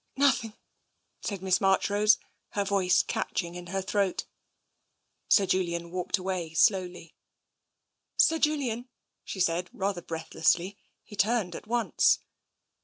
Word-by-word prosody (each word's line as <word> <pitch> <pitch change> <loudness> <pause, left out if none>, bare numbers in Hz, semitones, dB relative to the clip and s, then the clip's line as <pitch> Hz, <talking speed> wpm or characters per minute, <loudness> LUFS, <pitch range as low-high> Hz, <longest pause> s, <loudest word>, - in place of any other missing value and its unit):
Nothing,'' 255 -6 +2 0.6
said 195 -3 -4
Miss 185 -1 +2
Marchrose, 205 +2 +4 0.4
her 200 - 0
voice 190 -2 +3
catch - - -2
ing 170 0 -8
in 175 0 -8
her 195 +2 -2
throat. 195 0 0 1.0
Sir 200 - +5
Julian 170 -2 -1
walked 180 +2 -1
away 180 -4 -4
slowly. 180 -3 +1 0.5
" - - -55
Sir 325 0 -1
Julian! 260 -6 0 0.2
" - - -55
she 190 - -7
said, 175 0 +1
rather 195 -2 -2
breathlessly. 165 +4 0 0.2
He 210 - -12
turned 205 -3 +1
at - - -9
once. 235 0 +3
190 Hz, 130 wpm, -28 LUFS, 175-210 Hz, 1.0 s, Sir